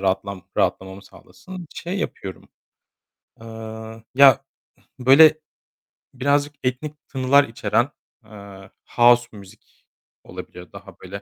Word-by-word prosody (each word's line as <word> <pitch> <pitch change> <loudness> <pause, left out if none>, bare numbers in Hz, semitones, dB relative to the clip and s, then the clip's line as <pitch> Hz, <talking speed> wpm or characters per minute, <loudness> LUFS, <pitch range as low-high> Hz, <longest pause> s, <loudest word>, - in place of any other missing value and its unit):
rahatlam 95 0 -2
rahatlamamı 95 +1 -2
sağlasın. 185 - -13
Şey 180 +3 -5
yapıyorum, 95 - -6 0.9
eee, 110 0 -10
ya 135 0 +6 0.5
böyle 155 +5 +6 0.7
birazcık 145 +2 0
etnik 145 +4 -4
tınılar 135 +1 +3
içeren, 115 +1 -1 0.4
eee, 100 -2 -13 0.3
house 120 0 +5
müzik 95 -1 -18 0.4
olabilir 90 -2 -11
daha - - -13
böyle. - - -9
120 Hz, 95 wpm, -22 LUFS, 100-140 Hz, 0.9 s, ya